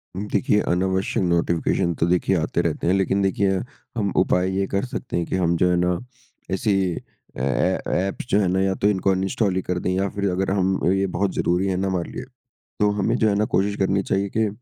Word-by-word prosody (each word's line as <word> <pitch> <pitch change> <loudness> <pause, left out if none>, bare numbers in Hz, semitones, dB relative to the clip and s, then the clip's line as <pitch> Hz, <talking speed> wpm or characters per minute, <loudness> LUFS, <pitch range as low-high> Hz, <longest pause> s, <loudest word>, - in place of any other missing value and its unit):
देखिए, 105 +1 +1
अनावश्यक 95 +2 0
नोटिफिकेशन 85 +1 +1
तो - - +3
देखिए 90 +2 +2
आते 80 - 0
रहते - - -2
हैं, 90 - +4
लेकिन 95 0 +1
देखिए, 95 0 +1 0.5
हम 100 -3 0
उपाय 90 0 +2
ये 100 0 0
कर 100 +5 -1
सकते 125 -8 -4
हैं 85 - 0
कि - - -3
हम 85 -2 +1
जो 90 - +3
है 90 - +3
ना, 90 0 +1 0.5
ऐसी 100 +3 +1 0.6
अ, - - -4
ए 65 0 +1 0.3
एप्स 100 - -5
जो 100 - +3
हैं 100 - +2
ना, 95 +1 +1
या 95 0 +2
तो 100 - +1
इनको 95 -1 +1
अनइन्स्टॉल 95 +1 0
ही 95 - 0
कर 90 0 -2
दें - - +2
या 95 +1 0
फिर 100 0 -1
अगर 95 +1 -1
हम 95 -1 +1 0.2
ये 95 0 +1
बहुत 95 0 +1
ज़रूरी 90 +3 +1
है 95 - 0
ना 95 +1 -1
हमारे 90 -3 -2
लिए, - - -6 0.6
तो 105 -1 +4
हमें 115 - +1
जो 110 -3 +3
है 100 - +1
ना 105 +1 +2
कोशिश 100 +1 +1
करनी 95 +1 +1
चाहिए 100 +1 +1
कि 110 -1 +3
95 Hz, 225 wpm, -23 LUFS, 90-100 Hz, 0.6 s, हैं